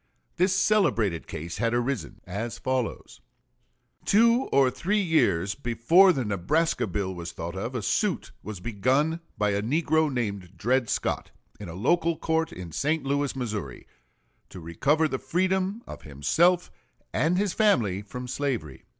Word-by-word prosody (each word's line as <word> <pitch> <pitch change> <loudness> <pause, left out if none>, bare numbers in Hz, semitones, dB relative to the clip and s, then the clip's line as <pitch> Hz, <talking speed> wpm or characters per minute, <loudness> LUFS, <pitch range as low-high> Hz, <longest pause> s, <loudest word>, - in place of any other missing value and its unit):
This 185 +2 +3
celebrated 120 - +2
case 85 +3 -6
had 115 0 +1
arisen 120 0 -2
as 105 +5 -4
follows: 130 -4 -3 0.8
Two 230 +5 +4
or 135 -2 +4
three 205 +10 0
years 105 - +2
before 120 - +4
the 135 -8 -1
Nebraska 105 - 0
bill 95 0 -2
was 85 -1 -6
thought 85 +2 -6
of, 115 +7 -4
a 120 - -2
suit 180 - 0
was 105 -3 -7
begun 130 - 0 0.2
by 105 0 +1
a 100 0 0
negro 155 +5 +1
named 100 -7 -4
Dred 125 +2 +1
Scott, - - -1 0.3
in 100 -4 -7
a 85 - -7
local 165 - +1
court 160 +1 0
in 90 -2 -8
St. 150 - 0
Louis, 140 0 -1
Missouri, 105 - -5 0.6
to 95 - -10
recover 140 - +1
the 130 -3 -3
freedom 190 +5 0
of - - -9
himself 160 - +2 0.4
and 170 +3 +2
his 200 -1 0
family 115 - +2
from 125 +5 -7
slavery. 125 - -3
125 Hz, 150 wpm, -26 LUFS, 100-165 Hz, 0.8 s, Two